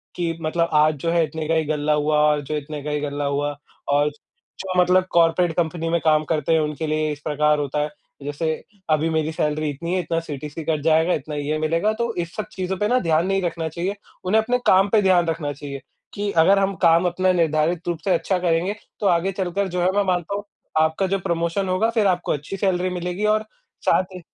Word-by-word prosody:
कि 165 -2 -2
मतलब, 170 +1 0
"आज 155 +1 +5
जो 165 - +1
है, 170 -1 +3
इतने 160 -1 -5
का 165 - +1
ही 160 -1 +1
गल्ला 150 0 0
हुआ 150 0 +1
और 150 -1 +1
जो 150 +3 -4
इतने 150 0 -6
का 150 - -3
ही 150 - 0
गल्ला 145 0 -3
हुआ।" 145 +1 -1 0.4
और 145 +1 +3 0.5
जो 185 -1 -1
मतलब 185 +1 +3
कॉर्पोरेट 170 0 +3
कंपनी 165 -1 -1
में 170 0 +2
काम 155 -1 +4
करते 155 +1 +1
हैं, 160 - +4
उनके 150 +1 -3
लिए 155 0 0
इस 145 - -6
प्रकार 150 0 +2
होता 145 +1 -2
है। 150 - -1 0.3
जैसे 155 +3 -2 0.4
अभी 155 +1 +2
मेरी 160 0 0
सैलरी 155 -1 -1
इतनी 170 +5 -4
है, 185 - +1
इतना 165 0 -1
सीटीसी 150 0 -7
कट 155 -3 0
जाएगा, 160 +2 +3
इतना 150 +1 -4
ये 145 +1 -1
मिलेगा, 165 +7 +1
तो 235 0 -2
इन 175 -1 -1
सब 215 - -2
चीज़ों 185 0 -3
पे 210 - 0
ना 250 +2 +3
ध्यान 165 0 +1
नहीं 195 0 +1
रखना 165 -2 -2
चाहिए। 180 +5 -3 0.3
उन्हें 220 +4 +3
अपने 245 +3 0
काम 190 +2 +5
पे 215 -1 +4
ध्यान 180 -3 +4
रखना 160 -3 -2
चाहिए 140 -1 -7 0.3
कि 205 0 -2
अगर 190 +4 +5
हम 195 0 0
काम 165 +2 +5
अपना 185 +1 +1
निर्धारित 165 +1 +1
रूप 170 -2 -1
से 190 - +3
अच्छा 185 +2 0
करेंगे, 175 +3 0 0.2
तो 205 - +1
आगे 175 +3 +2
चलकर 190 +1 -2
जो 180 0 -2
है 185 +1 +3
मैं 205 - +3
मानता 180 +1 -1
हूँ, 205 - -4 0.4
आपका 160 +5 +1
जो 195 +1 0
प्रमोशन 170 +1 -1
होगा, 215 +5 +2
फिर 220 -3 +2
आपको 180 -1 0
अच्छी 150 +7 -5
सैलरी 185 -1 +1
मिलेगी 180 +3 -3
और 215 0 +2 0.4
साथ 185 - +4
ही - - -6
165 Hz, 225 wpm, -22 LUFS, 155-185 Hz, 0.5 s, आज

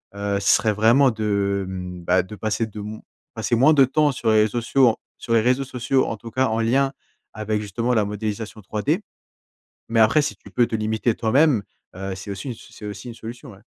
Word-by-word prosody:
heu, 100 0 -1
ce 100 - +1
serait 110 - +1
vraiment 115 +6 +5
de, 100 -3 -1
hem, 90 -1 -6
bah, 95 +2 +3
de 95 +4 -10
passer 110 +2 -1
de 105 -1 -9
m 105 +1 -7 0.3
passer 115 +1 0
moins 135 +7 +5
de 140 -3 +6
temps 150 +3 +2
sur 120 -3 -2
les 110 0 +5
ré - - +2
sociaux 120 +1 +2 0.2
sur 115 - -3
les 115 - +5
réseaux 125 +4 +2
sociaux, 130 0 0
en 115 - -4
tout 115 +2 -10
cas 130 +3 +1
en 110 +1 -1
lien 135 +4 +2 0.4
avec, 110 0 -2
justement, 115 +4 -1
la 110 -3 +3
modélisation 105 +1 -4
3D. 120 - -1 0.9
Mais 115 0 +1
après, 115 +7 +5
si 105 - -3
tu - - -16
peux 120 - +3
te - - -3
limiter 110 +2 0
toi-même, 125 +2 +3 0.3
heu, 95 0 -5
c'est 95 +2 -7
aussi 100 +7 -6
une 120 - -4
c'est 110 - -13
aussi 105 +2 -7
une - - -7
solution, 120 +4 -9
ouais. 100 0 -16
110 Hz, 220 wpm, -22 LUFS, 105-125 Hz, 0.9 s, de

